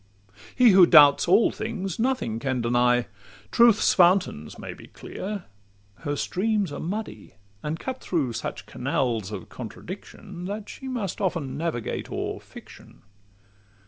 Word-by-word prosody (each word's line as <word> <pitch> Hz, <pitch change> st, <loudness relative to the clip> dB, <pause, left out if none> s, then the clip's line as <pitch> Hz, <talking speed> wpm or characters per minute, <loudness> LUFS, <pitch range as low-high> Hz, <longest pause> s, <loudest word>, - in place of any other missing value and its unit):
He 245 Hz, -3 st, +6 dB
who 185 Hz, -2 st, +7 dB
doubts 145 Hz, -3 st, +7 dB
all 195 Hz, +6 st, +5 dB
things 200 Hz, -5 st, -4 dB
nothing 225 Hz, -, 0 dB
can 130 Hz, 0 st, -1 dB
deny: 120 Hz, +1 st, +2 dB, 0.5 s
Truth's 235 Hz, -2 st, +5 dB
fountains 175 Hz, -, +2 dB
may -, -, -7 dB
be -, -, -14 dB
clear—her 100 Hz, -, -8 dB
streams 200 Hz, +3 st, -1 dB
are 145 Hz, -, -6 dB
muddy, 205 Hz, -, -6 dB, 0.3 s
And 155 Hz, +2 st, -4 dB
cut 260 Hz, -1 st, -5 dB
through 145 Hz, -9 st, -1 dB
such 115 Hz, -, -5 dB
canals 120 Hz, -6 st, -2 dB
of -, -, -7 dB
contradiction, 180 Hz, -, -9 dB
That 205 Hz, +2 st, -5 dB
she 265 Hz, -, -9 dB
must 235 Hz, -8 st, -4 dB
often 165 Hz, -9 st, -2 dB
navigate 155 Hz, -7 st, -3 dB
o'er -, -, -3 dB
fiction. -, -, -15 dB
170 Hz, 130 wpm, -25 LUFS, 125-205 Hz, 0.5 s, who